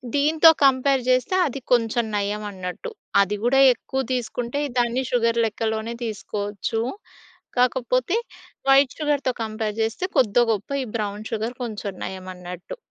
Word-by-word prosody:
దీంతో 310 +3 +6 0.2
కంపేర్ 270 0 +3
చేస్తే 255 +8 +2
అది 275 0 -5
కొంచెం 235 -1 +2
నయం 205 +1 -1
అన్నట్టు. 185 - -6 0.3
అది 200 +1 0
కూడా 255 +3 +3
ఎక్కువ 265 +3 -4
తీసుకుంటే 245 +2 -2 0.2
దాన్ని 240 +2 +1
షుగర్ 230 -1 +2
లెక్కలోనే 220 +1 -2
తీసుకోవచ్చు. 210 0 -3 0.8
కాకపోతే 255 - +2 0.5
వైట్ 270 -1 +5
షుగర్‌తో 290 -4 0
కంపేర్ 215 -1 -3
చేస్తే 225 +11 -2
కొద్దో 240 0 +4
గొప్పో 210 +5 -3
ఈ - - -5
బ్రౌన్ 210 0 -4
షుగర్ 225 +2 -2
కొంచెం 210 -3 -5
నయం 190 0 -7
అన్నట్టు. 180 - -8
235 Hz, 130 wpm, -23 LUFS, 210-260 Hz, 0.8 s, దీంతో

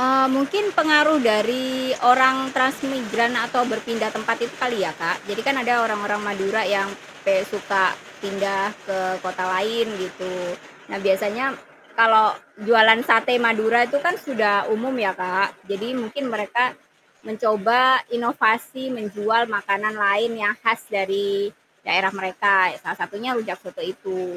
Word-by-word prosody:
Eee, 265 +1 +4
mungkin 335 +10 0
pengaruh 305 -1 +5
dari 235 +5 0 0.4
orang 260 +1 +6 0.2
transmigran 255 -3 0
atau 245 0 +1
berpindah 220 0 -3
tempat 225 +1 -1
itu - - -12
kali 240 -4 -1
ya, 155 - -4
Kak. 165 - -1
Jadi 205 +2 -4
kan, 275 -1 +2
ada 245 0 +2
orang-orang 205 -1 -2
Madura 200 +2 -1
yang 195 0 0 0.4
kayak 195 -1 +2
suka 195 -2 0 0.4
pindah 195 0 -2 0.2
ke 195 -1 -3 0.3
kota 185 0 -4
lain, 225 +5 0 0.2
gitu. 185 0 -8 0.6
Nah - - -5
biasanya 210 +6 0 0.5
kalau 220 -1 +7 0.4
jualan 225 0 +7
sate 230 +3 +4
Madura 225 +1 +3
itu 285 +3 0
kan 350 - +3
sudah 220 -7 +1 0.2
umum 255 +5 -3
ya, 190 - +1
Kak. 185 +2 0 0.2
Jadi 205 +3 -4
mungkin 235 +5 -6
mereka 215 +4 0 0.6
mencoba 220 +2 +1 0.4
inovasi 235 +2 0
menjual 215 +2 0 0.2
makanan 200 +2 -1
lain 210 +4 +2
yang 210 +1 +2
khas 230 0 +2 0.2
dari 195 +1 -1 0.6
daerah 190 +2 +2
mereka, 190 +1 +1 0.2
ya - - -11
salah - - -5
satunya 215 +5 -5
rujak 220 - -5
soto - - -12
itu. 185 -1 -6
220 Hz, 140 wpm, -21 LUFS, 200-240 Hz, 0.6 s, kalau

